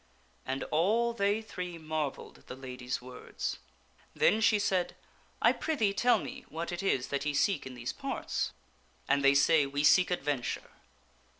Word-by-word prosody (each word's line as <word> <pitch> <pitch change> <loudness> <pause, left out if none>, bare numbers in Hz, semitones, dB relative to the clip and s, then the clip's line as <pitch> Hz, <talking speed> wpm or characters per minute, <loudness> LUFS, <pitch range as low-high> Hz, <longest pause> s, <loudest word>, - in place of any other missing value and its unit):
And 135 +1 -2
all 220 +9 +2
they 205 0 +1
three 180 -5 -6
marvelled 155 -3 -4
at - - -25
the 125 - -7
lady's 130 0 -5
words. 125 0 -5 0.6
Then 220 - +3
she 215 -1 +5
said, 190 -3 0 0.2
" - - -34
I - - +6
prithee 225 -11 0
tell 245 +4 +4
me 255 0 -7
what 165 +2 -4
it 175 - -3
is 135 -10 0
that 140 0 -1
ye 145 -1 -1
seek 190 +1 +1
in 130 - -9
these 120 0 -4
parts?" - - -3 0.6
And 140 0 +2
they 140 0 +6
say, 145 +1 +5
"We 140 +1 -2
seek 180 +4 +6
adventure." 145 -8 -2
155 Hz, 170 wpm, -31 LUFS, 140-200 Hz, 0.6 s, I